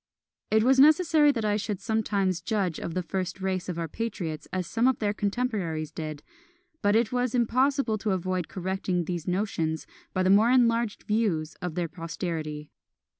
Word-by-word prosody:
It 220 Hz, 0 st, +4 dB
was 265 Hz, +2 st, +4 dB
necessary 310 Hz, 0 st, +6 dB
that 230 Hz, -5 st, -2 dB
I 210 Hz, 0 st, +2 dB
should 205 Hz, -2 st, -3 dB
sometimes 205 Hz, -5 st, 0 dB
judge 195 Hz, -7 st, -1 dB
of 165 Hz, -, -5 dB
the 185 Hz, -, -1 dB
first 185 Hz, +1 st, -3 dB
race 185 Hz, -1 st, -2 dB
of 175 Hz, -, -3 dB
our 165 Hz, -1 st, -2 dB
patriots 175 Hz, -5 st, -4 dB
as 185 Hz, -1 st, -2 dB
some 230 Hz, +8 st, +1 dB
of 260 Hz, -, +2 dB
their 205 Hz, -1 st, 0 dB
contemporaries 200 Hz, -, -2 dB
did; 155 Hz, -2 st, -6 dB, 0.6 s
but 205 Hz, 0 st, +3 dB
it 225 Hz, -1 st, +2 dB
was 250 Hz, -1 st, 0 dB
impossible 250 Hz, -1 st, +2 dB
to 210 Hz, -, -2 dB
avoid 185 Hz, -2 st, -1 dB
correcting 185 Hz, -1 st, -2 dB
these 175 Hz, -2 st, -4 dB
notions 175 Hz, -4 st, -1 dB, 0.3 s
by 185 Hz, -, 0 dB
the 185 Hz, -, +4 dB
more 210 Hz, +4 st, +6 dB
enlarged 235 Hz, -3 st, +2 dB
views 200 Hz, -8 st, 0 dB
of 180 Hz, -3 st, -4 dB
their 175 Hz, -1 st, -1 dB
posterity. 160 Hz, -3 st, -5 dB
195 Hz, 175 wpm, -27 LUFS, 175-230 Hz, 0.6 s, necessary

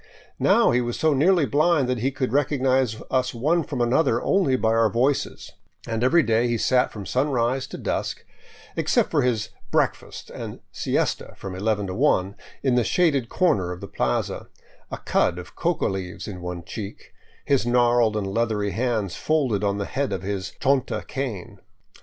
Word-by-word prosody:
Now -, -, +4 dB
he 125 Hz, -, +2 dB
was 120 Hz, -1 st, -3 dB
so 155 Hz, -1 st, +3 dB
nearly 165 Hz, +3 st, +4 dB
blind 150 Hz, -1 st, +2 dB
that 125 Hz, -1 st, -1 dB
he 130 Hz, +4 st, +1 dB
could 130 Hz, -3 st, -3 dB
recognize 130 Hz, -4 st, +1 dB
us 130 Hz, -1 st, 0 dB
one 155 Hz, +8 st, +1 dB
from 125 Hz, -, -4 dB
another 120 Hz, 0 st, +2 dB
only 185 Hz, -10 st, +2 dB
by 115 Hz, -3 st, +1 dB
our 115 Hz, 0 st, +3 dB
voices; 130 Hz, +7 st, -1 dB, 0.3 s
and 115 Hz, 0 st, -2 dB
every 165 Hz, +6 st, +4 dB
day 115 Hz, 0 st, +2 dB
he 120 Hz, -1 st, 0 dB
sat 125 Hz, +3 st, +2 dB
from 105 Hz, -3 st, -8 dB
sunrise 130 Hz, 0 st, 0 dB
to -, -, -8 dB
dusk, -, -, -3 dB, 0.5 s
except -, -, +1 dB
for -, -, +3 dB
his 115 Hz, -4 st, 0 dB
" -, -, -32 dB
breakfast -, -, -1 dB
" -, -, -11 dB
and -, -, -7 dB
siesta -, -, -2 dB
from 95 Hz, -, -7 dB
eleven 105 Hz, +2 st, -1 dB
to 95 Hz, -, -4 dB
one, 100 Hz, -6 st, +2 dB, 0.3 s
in 130 Hz, -, +2 dB
the 120 Hz, -1 st, +3 dB
shaded 140 Hz, -6 st, +1 dB
comer 145 Hz, -, +1 dB
of 90 Hz, -, -6 dB
the -, -, -8 dB
plaza, 60 Hz, 0 st, -2 dB, 0.4 s
a -, -, -5 dB
cud 85 Hz, -, +1 dB
of 90 Hz, 0 st, -10 dB
coca 175 Hz, -1 st, 0 dB
leaves 95 Hz, -3 st, -4 dB
in 95 Hz, -4 st, -7 dB
one 90 Hz, -1 st, -5 dB
cheek, 100 Hz, +3 st, -8 dB, 0.3 s
his 135 Hz, -4 st, +2 dB
gnarled 120 Hz, -2 st, +3 dB
and 105 Hz, -, -2 dB
leathery 105 Hz, 0 st, -1 dB
hands 110 Hz, -6 st, -1 dB
folded 130 Hz, -10 st, 0 dB
on 100 Hz, -1 st, +1 dB
the 100 Hz, -, -2 dB
head 135 Hz, +5 st, -2 dB
of 95 Hz, -, -3 dB
his 95 Hz, -2 st, -4 dB
chonta 135 Hz, -1 st, 0 dB
cane. 130 Hz, -10 st, -5 dB
120 Hz, 180 wpm, -24 LUFS, 105-135 Hz, 0.5 s, Now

